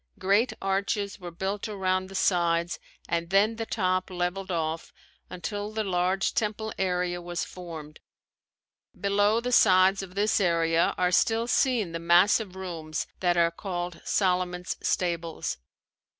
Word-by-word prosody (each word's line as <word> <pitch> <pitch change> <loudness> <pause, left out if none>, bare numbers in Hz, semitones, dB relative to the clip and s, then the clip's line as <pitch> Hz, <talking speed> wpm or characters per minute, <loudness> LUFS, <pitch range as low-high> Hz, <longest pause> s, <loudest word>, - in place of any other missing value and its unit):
Great 200 +6 +2
arches 200 +1 -1
were 180 -2 -7
built 190 +5 -3
around 185 -2 -1
the 195 - -10
sides 170 -2 +1 0.3
and 170 0 -1
then 205 +4 +3
the 225 -1 -4
top 185 -3 0
leveled 185 +1 -3
off 165 -2 -2 0.4
until 205 +3 -5
the 215 0 -2
large 185 0 0
temple 220 -3 -2
area 180 -1 0
was 175 0 -3
formed. 160 -4 -9 1.0
Below 205 +2 +2
the 250 +1 -3
sides 190 -3 +5
of 190 -1 -10
this 210 +2 +2
area 165 -2 +2
are 180 0 +2
still 225 +5 +2
seen 240 -6 +1
the 165 - -4
massive 180 +4 +3
rooms 165 -5 -4
that 175 -1 +1
are 170 0 +4
called 175 -1 -5
Solomon's 180 -2 0
stables. 170 - -2
185 Hz, 135 wpm, -27 LUFS, 175-200 Hz, 1.0 s, sides